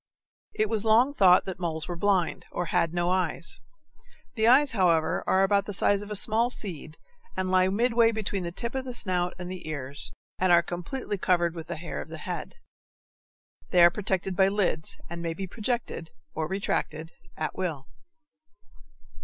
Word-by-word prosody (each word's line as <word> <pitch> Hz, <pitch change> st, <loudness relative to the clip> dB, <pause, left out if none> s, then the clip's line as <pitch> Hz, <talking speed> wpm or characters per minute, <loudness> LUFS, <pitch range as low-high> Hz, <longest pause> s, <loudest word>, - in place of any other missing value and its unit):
It 215 Hz, -, +1 dB
was 215 Hz, -1 st, -1 dB
long 230 Hz, +5 st, +4 dB
thought 185 Hz, -8 st, +5 dB
that 190 Hz, -1 st, -6 dB
moles 160 Hz, -3 st, -3 dB
were 175 Hz, -, -4 dB
blind, 185 Hz, -2 st, 0 dB
or 175 Hz, -, -2 dB
had 165 Hz, 0 st, +1 dB
no 175 Hz, +1 st, 0 dB
eyes. 180 Hz, -2 st, -1 dB, 0.7 s
The 220 Hz, -1 st, +1 dB
eyes, 270 Hz, +4 st, +6 dB
however, 170 Hz, -6 st, +2 dB
are 190 Hz, +1 st, +3 dB
about 200 Hz, 0 st, +2 dB
the 205 Hz, -, -4 dB
size 200 Hz, +1 st, +2 dB
of 205 Hz, -, -9 dB
a 210 Hz, -, -3 dB
small 225 Hz, +4 st, +4 dB
seed 165 Hz, -, -5 dB, 0.4 s
lie 185 Hz, 0 st, +2 dB
midway 230 Hz, +3 st, +3 dB
between 205 Hz, -3 st, -2 dB
the 170 Hz, -1 st, -4 dB
tip 235 Hz, +6 st, -4 dB
of 265 Hz, 0 st, -2 dB
the 250 Hz, -2 st, -4 dB
snout 180 Hz, -4 st, 0 dB
and 180 Hz, 0 st, -6 dB
the 180 Hz, -4 st, -7 dB
ears, 140 Hz, -1 st, -3 dB, 0.3 s
and 185 Hz, -1 st, +3 dB
are 170 Hz, 0 st, +6 dB
completely 195 Hz, +5 st, -5 dB
covered 175 Hz, -2 st, +2 dB
with 165 Hz, -1 st, -8 dB
the 170 Hz, -, -4 dB
hair 170 Hz, +2 st, -5 dB
of -, -, -10 dB
the -, -, -7 dB
head. -, -, -5 dB, 1.1 s
They 180 Hz, -2 st, +5 dB
are 170 Hz, -, +8 dB
protected 190 Hz, -1 st, -2 dB
by 190 Hz, +1 st, +4 dB
lids, 195 Hz, -6 st, -1 dB
and 170 Hz, 0 st, -7 dB
may 165 Hz, -1 st, -3 dB
be 195 Hz, -, -4 dB
projected 215 Hz, -4 st, -3 dB, 0.2 s
or 155 Hz, 0 st, -2 dB
retracted 165 Hz, -4 st, -2 dB, 0.3 s
at -, -, -3 dB
will. 160 Hz, -8 st, -3 dB
185 Hz, 180 wpm, -27 LUFS, 170-210 Hz, 1.1 s, are